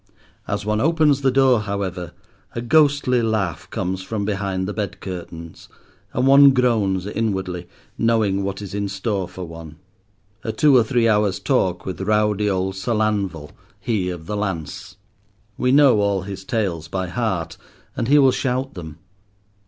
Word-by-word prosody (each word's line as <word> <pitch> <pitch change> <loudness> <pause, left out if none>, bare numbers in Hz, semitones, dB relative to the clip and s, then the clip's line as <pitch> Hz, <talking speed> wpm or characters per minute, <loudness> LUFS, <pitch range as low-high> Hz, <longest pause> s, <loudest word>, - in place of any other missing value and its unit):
As 100 0 -3
one 105 0 0
opens 155 -2 +3
the 135 - +3
door, 130 -2 +4
however, 95 -4 -4 0.4
a 115 - -2
ghostly 140 -2 +3
laugh 110 -7 -2
comes 95 0 -3
from 100 +1 -3
behind 95 -2 -2
the 105 - -3
bed 105 -4 -4
curtains, 85 -3 -8 0.4
and 125 - 0
one 140 0 +7
groans 110 -7 +1
inwardly, 95 -5 -3 0.3
knowing 110 -4 +2
what 100 +1 -4
is 100 - -8
in 100 -1 -2
store 100 -1 -2
for 90 +1 -8
one: 80 -2 -10 0.7
a 110 - -2
two 140 +5 +4
or 120 - +6
three 120 -1 +1
hours' 105 -3 +2
talk 95 -10 0
with 95 0 -5
rowdy 105 0 +1
old 95 0 -1
Sir 95 +5 -2
Lanval—he 100 0 -2
of 90 -3 -6
the 105 - -4
lance. 95 -6 -4 0.6
We 125 +3 +1
know 135 -5 +6
all 100 -2 0
his 95 0 -7
tales 95 -8 -2
by 95 -1 -3
heart, 90 -6 -2 0.4
and 115 - -2
he 145 +3 +5
will 135 -2 +6
shout 130 +1 -2
them. 80 -4 -9
100 Hz, 160 wpm, -21 LUFS, 95-120 Hz, 0.7 s, one